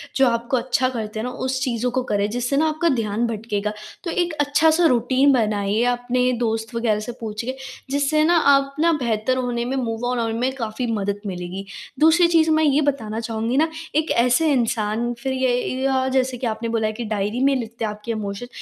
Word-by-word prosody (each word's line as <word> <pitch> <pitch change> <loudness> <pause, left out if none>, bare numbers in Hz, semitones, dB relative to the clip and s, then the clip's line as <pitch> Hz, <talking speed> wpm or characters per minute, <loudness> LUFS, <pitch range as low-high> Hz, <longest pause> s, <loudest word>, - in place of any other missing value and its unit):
जो 270 -1 +4
आपको 235 +2 0
अच्छा 255 +1 +1
करते 220 -3 -5
है 220 - -3
ना, - - -2
उस 260 +1 -2
चीज़ों 245 -2 -1
को 255 +1 -1
करें 205 0 +1
जिससे 245 +4 -1
ना 315 +2 +3
आपका 315 +2 0
ध्यान 220 0 -1
भटकेगा। 215 -2 -3 0.3
तो 335 - -3
एक 345 -2 0
अच्छा-सा 315 +4 +3
रूटीन 260 +1 +3
बनाइए, 210 -2 +1
अपने 250 +1 0
दोस्त 225 0 -2
वग़ैरह 225 -3 +1
से 215 +3 -5
पूछिए, 225 +4 -4 0.4
जिससे 285 +2 +2
ना 340 +2 +4 0.2
आप 275 0 +1
ना 335 +2 +4
बेहतर 235 +2 0
होने 245 -2 -1
में, 260 +2 -2
मूव 230 -2 -2
ऑन 250 - -1
होने 225 -1 -1
में 255 +2 +1
काफ़ी 235 0 -3
मदद 205 -2 -2
मिलेगी। 180 +1 -5 0.3
दूसरी 325 +3 +5
चीज़ 325 -2 +3
मैं 315 0 +3
ये 290 0 +3
बताना 220 -5 -6
चाहूँगी 230 +2 -2
ना, 320 +2 +3 0.3
एक 310 +1 +1
ऐसे 250 +7 +3
इंसान 230 -2 0
फिर 265 - -1
ये 260 -1 +1 0.3
या 265 -1 +1
जैसे 255 -1 0
कि 240 - -2
आपने 225 +1 -3
बोला 225 -1 0
है 215 - -3
कि 240 +2 -5
डायरी 210 +2 -2
में 275 0 +4
लिखते 230 -2 -4
आपके 210 +2 -5
इमोशन, 210 +2 -4
245 Hz, 205 wpm, -22 LUFS, 220-270 Hz, 0.4 s, दूसरी